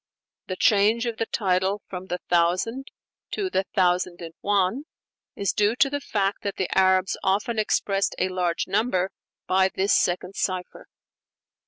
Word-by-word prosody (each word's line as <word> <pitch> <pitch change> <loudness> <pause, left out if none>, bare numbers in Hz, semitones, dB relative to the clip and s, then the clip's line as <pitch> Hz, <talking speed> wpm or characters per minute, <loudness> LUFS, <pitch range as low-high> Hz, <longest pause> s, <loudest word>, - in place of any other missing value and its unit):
The 185 - -3
change 215 +3 +3
of 235 -2 -3
the 225 - -1
title 190 0 0
from 185 0 -7
'The 180 - -2
Thousand' 185 +10 +1 0.4
to 385 -3 -2
'The 190 - 0
Thousand 180 -2 +2
and 165 -1 -8
One' 205 +7 +1 0.5
is 200 - -1
due 210 +2 +2
to 275 +1 +3
the 285 0 -2
fact 200 -5 -1
that 200 -1 -3
the 190 - -2
Arabs 190 0 +3
often 210 +4 0
expressed 200 -2 0
"a 185 - 0
large 180 -2 -1
number" 195 -2 0 0.3
by 190 0 +3
this 195 +1 +1
second 180 +2 +1
cipher. 185 -1 -3
195 Hz, 155 wpm, -25 LUFS, 185-215 Hz, 0.5 s, change